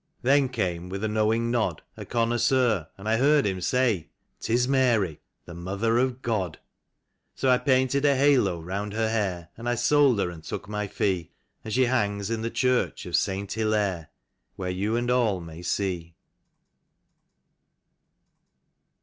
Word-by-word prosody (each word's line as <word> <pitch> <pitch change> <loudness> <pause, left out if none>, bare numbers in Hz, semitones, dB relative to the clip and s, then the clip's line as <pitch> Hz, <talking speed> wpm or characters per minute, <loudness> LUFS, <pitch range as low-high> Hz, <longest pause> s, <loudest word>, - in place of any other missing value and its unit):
Then 135 +1 +4
came, 90 -7 -2
with 100 +2 -5
a - - +1
knowing 110 +2 +1
nod, 110 -9 -1
A - - -8
connoisseur, 120 - +1
and 100 +2 -9
I 110 +1 +2
heard 145 +3 +4
him 95 -2 -1
say: 115 -5 +1 0.2
" - - -48
'Tis 120 +2 +1
Mary, 120 - +2 0.3
the 85 - -10
Mother 100 +7 -1
of 130 0 -1
God." 100 -9 -1 0.8
So 130 - +2
I 125 - +4
painted 130 0 +2
a 140 -1 +4
halo 130 -10 +3
round 100 +5 -4
her 110 0 0
hair, 95 -6 -2
And 120 +1 -4
I 120 - +1
sold 130 +1 +4
her, 90 -3 0
and 80 -2 -11
took 100 - -6
my 105 0 -3
fee, 95 -4 -2 0.3
And 110 - -6
she 130 +3 +3
hangs 105 -4 0
in 115 -1 -1
the 115 - -2
church 125 0 0
of - - -2
Saint 95 +1 -1
Hillaire, 105 -7 0 0.5
Where 90 -1 -3
you 100 +5 -1
and 120 +1 0
all 115 -7 +2
may 85 0 -9
see. 90 -2 -2
110 Hz, 160 wpm, -26 LUFS, 95-125 Hz, 0.8 s, Then